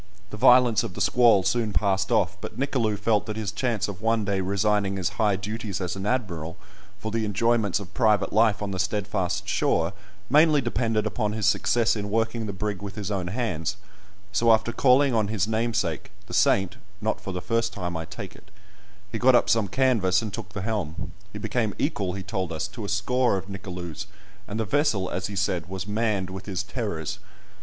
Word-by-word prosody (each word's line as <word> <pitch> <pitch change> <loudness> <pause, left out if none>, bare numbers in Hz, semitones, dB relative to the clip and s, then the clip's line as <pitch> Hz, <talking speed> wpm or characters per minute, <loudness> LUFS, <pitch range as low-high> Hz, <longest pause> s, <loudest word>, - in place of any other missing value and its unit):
The - - -5
violence 125 -1 +6
of 90 - -5
the - - -6
squall 100 +1 +5
soon 105 +2 0
passed 95 -2 +1
off, - - +2
but - - -7
Nicolou 125 -6 0
felt 105 +1 +1
that 110 - -3
his 105 -3 -2
chance 115 -2 -1
of 100 -1 -7
one 115 -1 +1
day 100 -1 0
resigning 100 +1 +1
his 95 -1 0
high 105 -2 +3
duties 105 0 -4
as 90 -1 -3
an 95 +1 -4
admiral 90 -9 -2 0.4
for 110 +1 -5
the 115 0 0
enjoyments 105 -1 +1
of 100 -1 -10
private 105 -5 +2
life 110 -2 +3
on 100 - -3
the 95 - -4
steadfast 95 -1 -1
shore 85 -1 +1 0.3
mainly 150 +2 +5
depended 115 -3 0
upon 105 -1 -1
his 110 -2 -1
success 115 +3 +3
in 105 -1 -4
working 115 +1 0
the - - -2
brig 100 0 -3
with 100 -1 -7
his 105 -2 -4
own 95 -3 -2
hands, 95 -5 -2 0.5
so 115 +4 +4
after 110 +1 +3
calling 135 +2 +4
on 110 -3 +2
his 105 -2 0
namesake, 110 -7 -1 0.2
the - - -10
saint 95 -1 +3 0.2
(not 110 0 -1
for 100 - -5
the 90 - -3
first 115 +3 0
time, 90 -3 -4
I 80 0 -3
take - - -8
it), 100 - -17 0.6
he 110 - -3
got 130 +2 +5
up - - +4
some 110 -3 +2
canvas, 110 -5 +2
and 105 -3 -5
took 105 -3 -7
the 95 - -4
helm: 100 -7 -3 0.2
he 105 - -7
became 110 0 -1
equal, 100 - -1
he 95 0 -5
told 95 -2 -3
us, 80 -1 -2
to 115 - -8
a 100 - -4
score 110 +3 +1
of 95 - -6
Nicolous, 90 -3 -6 0.4
and 105 +2 -4
the 110 - 0
vessel, 115 -9 +1
as 95 - -2
he 100 - -7
said, 90 -3 -1
was 95 0 -4
"manned 105 -3 -1
with 95 +1 -8
his 95 -1 -2
terrors." 100 -3 -4
105 Hz, 205 wpm, -25 LUFS, 95-115 Hz, 0.6 s, violence